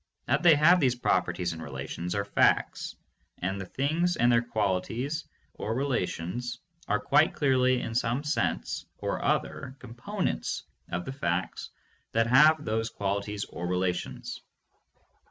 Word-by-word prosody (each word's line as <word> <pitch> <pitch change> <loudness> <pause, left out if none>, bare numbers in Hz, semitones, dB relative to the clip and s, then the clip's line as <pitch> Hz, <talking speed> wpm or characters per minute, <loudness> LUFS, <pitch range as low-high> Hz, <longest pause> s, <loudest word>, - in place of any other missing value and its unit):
That - - +2
they 170 -3 +7
have 170 +5 +6
these 130 -5 +3
properties 90 -7 0
and 80 - -8
relations 70 +5 -5
are 100 0 0
facts, 100 - +2 0.4
and 95 +2 -2
the 95 - -7
things 160 - 0
and 120 +1 +4
their 120 0 +5
qualities 120 +6 -1 0.3
or 110 - -3
relations 120 -2 -2 0.3
are - - +2
quite - - +3
clearly 130 -2 +3
in 115 - -4
some 120 +3 0
sense 115 - -1
or - - -3
other 130 - -1
components 130 - -3 0.3
of 90 +1 -2
the 135 - -5
facts 90 -8 -2 0.4
that 115 0 +3
have 150 +5 +6
those 115 +1 0
qualities 100 0 -2
or 90 +1 -6
relations. 90 0 -2
115 Hz, 135 wpm, -28 LUFS, 95-135 Hz, 0.4 s, they